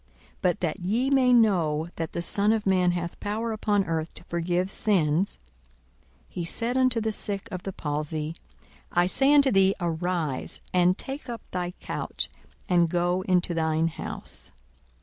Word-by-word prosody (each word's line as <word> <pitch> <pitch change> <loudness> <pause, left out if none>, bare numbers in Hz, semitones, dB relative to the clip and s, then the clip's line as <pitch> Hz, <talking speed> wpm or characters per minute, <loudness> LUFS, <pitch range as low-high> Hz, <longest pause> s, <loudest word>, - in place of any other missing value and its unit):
42:005:024 - - -34 0.3
But 180 -2 +1
that 170 +2 -1
ye 220 +9 0
may 260 -2 +4
know 170 -9 +3
that 165 -1 -4
the 170 - -2
Son 200 +4 +2
of 220 -1 0
man 180 -2 +3
hath 175 -1 -4
power 220 +3 -2
upon 210 -2 +1
earth 160 0 -2
to - - -11
forgive 175 +2 -1
sins, 180 -3 +1 0.9
(he 175 - -5
said 230 +8 -1
unto 255 -2 +3
the 220 0 -1
sick 205 0 0
of 185 -2 -4
the 195 - -5
palsy,) 150 0 -3 0.6
I 175 0 +3
say 270 +9 +3
unto 285 -2 +6
thee, 195 0 +4
Arise, 170 -4 -1
and 180 0 +4
take 270 -1 -5
up 235 -2 -6
thy 180 -1 -3
couch, - - -4 0.4
and 175 -2 +3
go 175 +2 +1
into 180 -1 +2
thine 160 0 +1
house. - - -7
180 Hz, 165 wpm, -26 LUFS, 170-215 Hz, 0.9 s, unto